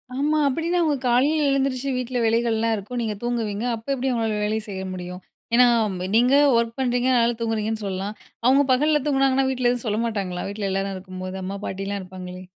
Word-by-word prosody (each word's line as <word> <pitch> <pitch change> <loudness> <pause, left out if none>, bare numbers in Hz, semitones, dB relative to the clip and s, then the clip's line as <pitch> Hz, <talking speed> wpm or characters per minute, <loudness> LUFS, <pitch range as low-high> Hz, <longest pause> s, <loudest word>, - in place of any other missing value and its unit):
ஆமா, 295 +3 +1
அப்டின்னா 330 +6 0
அவங்க 310 -3 +2
காலையில 285 +6 +3
எழுந்திரிச்சு 275 -1 0
வீட்ல 250 0 -3
வேலைகள்லா 230 0 +1
இருக்கும். 215 +4 -5
நீங்க 220 -2 -2
தூங்குவீங்க, 230 -3 -2
அப்ப 225 +3 -13
எப்படி 265 0 -1
அவங்களால 225 -3 -1
வேலை 215 +1 0
செய்ய 190 -1 -5
முடியும்? 180 0 -7 0.3
ஏனா 250 +1 +7 0.5
நீங்க 245 +4 +5 0.2
ஒர்க் 230 +1 -1
பண்றீங்க, 245 -1 +1
அதனால 235 0 +3
தூங்குறீங்கன்னு 220 -1 -1
சொல்லலாம். 195 +2 -3 0.3
அவங்க 270 +3 +5
பகல்ல 300 +3 +2
தூங்குனாங்கன்னா 270 -1 +2
வீட்ல 250 -2 +1
எதுவும் 245 0 -4
சொல்ல 210 +1 0
மாட்டாங்களா? 190 -5 -3
வீட்ல 200 -1 -3
எல்லாரும் 195 0 -2
இருக்கும்போது 185 0 -7
அம்மா, 195 +2 -4
பாட்டிலா 195 +1 -3
இருப்பாங்களே? 185 0 -9
230 Hz, 170 wpm, -23 LUFS, 200-255 Hz, 0.5 s, ஏனா